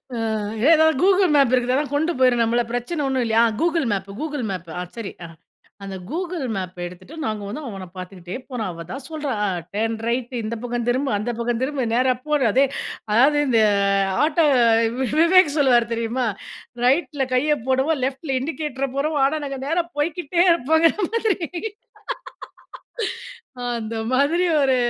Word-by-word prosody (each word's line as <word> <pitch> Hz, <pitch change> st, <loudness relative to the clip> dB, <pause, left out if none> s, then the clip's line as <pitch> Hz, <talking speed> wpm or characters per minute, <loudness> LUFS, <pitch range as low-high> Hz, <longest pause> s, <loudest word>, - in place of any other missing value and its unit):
ஆ -, -, -3 dB, 0.5 s
ஏதாவது 315 Hz, -1 st, +5 dB
Google 380 Hz, -2 st, +4 dB
map 275 Hz, -4 st, +4 dB
இருக்குதாதான் 255 Hz, +3 st, +1 dB
கொண்டு 320 Hz, +4 st, +1 dB
போயிரும் 250 Hz, -2 st, +4 dB
நம்மள 235 Hz, +1 st, +2 dB
பிரச்சனை 245 Hz, +7 st, -2 dB
ஒன்னும் 260 Hz, -2 st, 0 dB
இல்லையா, 225 Hz, 0 st, +3 dB
ஆ -, -, +4 dB
கூகுள் 330 Hz, -5 st, +1 dB
மேப் 195 Hz, 0 st, -4 dB
கூகுள் 295 Hz, -5 st, -3 dB
மேப் 180 Hz, -3 st, -6 dB
ஆ -, -, -2 dB, 0.2 s
சரி. 225 Hz, -4 st, -5 dB
அ -, -, -8 dB, 0.6 s
அந்த 195 Hz, -1 st, -6 dB, 0.2 s
கூகுள் 345 Hz, -1 st, -3 dB
மேப்ப 185 Hz, -1 st, -5 dB
எடுத்துட்டு 180 Hz, -, -12 dB
நாங்க 215 Hz, -3 st, -2 dB
வந்து 230 Hz, +10 st, -5 dB
அவன 195 Hz, -4 st, -7 dB
பார்த்துக்கிட்டே 185 Hz, -1 st, -8 dB
போரான். 230 Hz, -6 st, -3 dB
அவ 170 Hz, 0 st, -8 dB
தான் 270 Hz, +1 st, -6 dB
சொல்றா 305 Hz, -3 st, -3 dB
அ -, -, +1 dB, 0.3 s
டர்ன் 225 Hz, +1 st, 0 dB
ரைட் 245 Hz, +1 st, -2 dB
இந்த 220 Hz, +2 st, -3 dB
பக்கம் 240 Hz, -1 st, -2 dB
திரும்பு, 265 Hz, +3 st, 0 dB
அந்த 215 Hz, +4 st, -2 dB
பக்கம் 235 Hz, 0 st, -1 dB
திரும்ப 270 Hz, -1 st, -1 dB
நேரா 255 Hz, +1 st, +3 dB
போடு 300 Hz, -2 st, +2 dB
அதே 265 Hz, +5 st, +4 dB, 0.5 s
அதாவது 270 Hz, +7 st, +5 dB
இந்த 230 Hz, -4 st, +3 dB, 0.6 s
ஆட்டோ 315 Hz, +1 st, +3 dB, 0.8 s
விவேக் 335 Hz, -3 st, +5 dB
சொல்லுவார் 240 Hz, -5 st, +3 dB
தெரியுமா 230 Hz, +2 st, -1 dB, 0.6 s
ரைட்ல 275 Hz, +1 st, +2 dB
கைய 295 Hz, +4 st, +3 dB
போடுவோம் 265 Hz, +3 st, +1 dB
லெஃட்ல 270 Hz, +1 st, -3 dB
இண்டிகேட்டர 275 Hz, -2 st, -3 dB
போடுவோம் 290 Hz, 0 st, +1 dB
ஆனா, 310 Hz, +3 st, -2 dB
நாங்க 275 Hz, -1 st, -5 dB
நேரா 335 Hz, +3 st, +1 dB
போய்க்கிட்டே 340 Hz, +3 st, +1 dB
இருப்போங்கற 320 Hz, +1 st, +3 dB, 0.2 s
மாதிரி 435 Hz, -7 st, 0 dB, 2.3 s
அந்த 225 Hz, 0 st, -5 dB, 0.2 s
மாதிரி 295 Hz, +7 st, +3 dB, 0.2 s
ஒரு 265 Hz, -2 st, +3 dB
265 Hz, 155 wpm, -22 LUFS, 235-310 Hz, 2.3 s, ஏதாவது